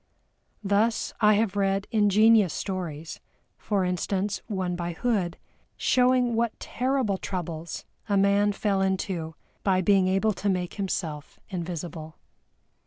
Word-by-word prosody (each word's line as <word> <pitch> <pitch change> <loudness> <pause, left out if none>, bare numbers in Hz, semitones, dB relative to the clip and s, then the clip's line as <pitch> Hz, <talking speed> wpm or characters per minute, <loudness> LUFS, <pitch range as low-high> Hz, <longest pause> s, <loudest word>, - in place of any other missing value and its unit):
Thus 210 +3 +1
I 210 -1 +6
have 210 -1 +1
read 195 0 +1
ingenious 215 -2 +4
stories, 165 -5 -4
as - - -29 0.4
for 200 -3 0
instance 190 +3 -1
one 185 -5 -2
by 175 0 -3
HOOD, 190 -3 -1 0.4
showing 250 -1 +3
what 230 0 -1
terrible 250 -6 -1
troubles 170 -3 -5 0.2
a 200 - +3
man 200 +1 +3
fell 200 -1 0
into 185 -4 -2 0.3
by 185 -2 +3
being 190 0 +4
able 195 +3 +2
to 200 - -2
make 180 -2 -1
himself 165 -6 -4
invisible. 170 -3 -5
195 Hz, 125 wpm, -26 LUFS, 180-210 Hz, 0.4 s, I